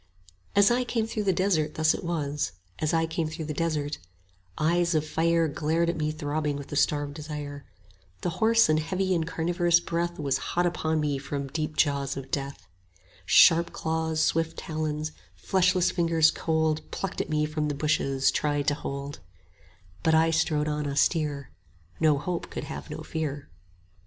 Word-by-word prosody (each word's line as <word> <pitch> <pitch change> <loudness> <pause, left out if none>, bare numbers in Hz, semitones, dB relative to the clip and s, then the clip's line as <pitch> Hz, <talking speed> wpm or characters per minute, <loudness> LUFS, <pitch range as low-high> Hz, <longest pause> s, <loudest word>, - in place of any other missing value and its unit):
15 - - +5
As 200 - +5
I 250 +1 +2
came 230 -2 -1
through 215 -2 -3
the 195 - +4
desert 170 -5 +1
thus 155 0 +3
it - - -6
was, 145 - -2 0.3
As 155 - 0
I 165 0 +2
came 160 0 -2
through 160 0 -5
the 150 - -4
desert: 150 -2 -2 0.6
Eyes 170 +2 +2
of 155 0 +1
fire 165 +1 +2
Glared 160 +3 0
at - - -7
me 155 -1 -1
throbbing 150 -1 -2
with 140 - -9
a - - -3
starved 145 0 +1
desire; 145 -2 -7 0.6
The 175 - -1
hoarse 225 +1 +5
and 155 0 +3
heavy 185 +4 -1
and 165 -2 0
carnivorous 175 +1 +2
breath 170 0 -2
Was 140 -3 0
hot 175 +1 -1
upon 160 -2 0
me 145 -2 -1
from 140 0 -4
deep 155 +1 -3
jaws 140 -2 +1
of 135 -1 -7
death; 140 0 -3 0.6
20 - - -27
Sharp 170 +1 +6
claws, 160 0 -1
swift 165 0 0
talons, 155 -1 -3 0.2
fleshless 185 -1 +2
fingers 165 -2 +3
cold 160 -1 0
Plucked 195 - -3
at - - -6
me 150 -1 +1
from 155 0 -2
the 145 - -2
bushes, 140 -2 +1
tried 145 -1 0
to - - 0
hold: 140 0 -5 0.8
But 160 - +3
I 165 +1 +4
strode 155 -2 +1
on 150 -1 -2
austere; 145 -1 0 0.5
No 155 -3 +4
hope 175 +4 -4
could - - -5
have - - -7
no - - -6
fear. 145 -3 -4
155 Hz, 175 wpm, -27 LUFS, 145-170 Hz, 0.8 s, Sharp